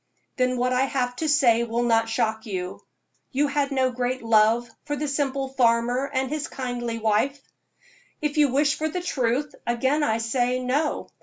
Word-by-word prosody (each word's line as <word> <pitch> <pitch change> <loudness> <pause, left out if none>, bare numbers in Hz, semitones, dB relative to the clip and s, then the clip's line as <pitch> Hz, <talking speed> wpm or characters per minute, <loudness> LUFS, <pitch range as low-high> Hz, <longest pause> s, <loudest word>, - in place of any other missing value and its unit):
"Then 255 -1 +1
what 250 +1 +1
I 255 +1 +3
have 250 -2 -1
to 315 +2 -1
say 245 -6 +4
will 235 +1 -1
not 225 -1 +2
shock 220 0 -1
you. 185 -3 -5 0.5
You 285 +2 +2
had 280 0 0
no 260 -1 +1
great 250 0 -2
love 225 +1 +3 0.2
for 290 - -3
the 300 +1 -3
simple 275 -1 -1
farmer 245 +1 +1
and 265 -1 0
his 305 -1 -2
kindly 245 -3 -4
wife?" 225 +6 +1 0.8
"If 300 -1 -2
you 295 - +6
wish 290 +3 +2
for 315 +1 0
the 360 +3 -3
truth, 270 -2 -1
again 260 +5 +1
I 225 -6 +1
say 245 +2 0
no. 260 +5 -1
255 Hz, 175 wpm, -24 LUFS, 235-280 Hz, 0.8 s, you